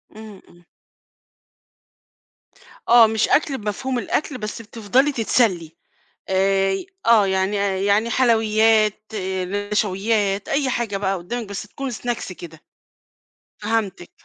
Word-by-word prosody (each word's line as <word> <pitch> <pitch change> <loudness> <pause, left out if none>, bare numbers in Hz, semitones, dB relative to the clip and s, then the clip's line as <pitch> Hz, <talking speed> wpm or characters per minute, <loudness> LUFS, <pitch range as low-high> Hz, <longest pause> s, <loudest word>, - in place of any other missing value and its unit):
إمم، 215 -3 -11
إمم. 175 0 -21 2.2
آه، 235 -2 +8
مش 220 0 0
أكل 285 -3 +2
بمفهوم 240 +5 -3
الأكل 285 +1 -2
بس 215 0 -6
بتفضلي 235 +6 0
تتسلي 205 - 0 0.5
آآ، 195 0 +2 0.3
آه، 220 -4 +5
يعني 190 +2 0 0.3
يعني 210 +3 +2
حلويات، 220 -3 +2 0.7
نشويات، 205 0 0
أي 275 -1 0
حاجة 235 -5 -2
بقى 195 -1 -1
قدامِك 215 +5 -6
بس 200 - -5
تكون 265 +5 -6
Snacks 235 -4 -4
كده، 165 -3 -11 1.0
فهمتِك، 205 -5 -2
215 Hz, 105 wpm, -21 LUFS, 195-235 Hz, 2.2 s, آه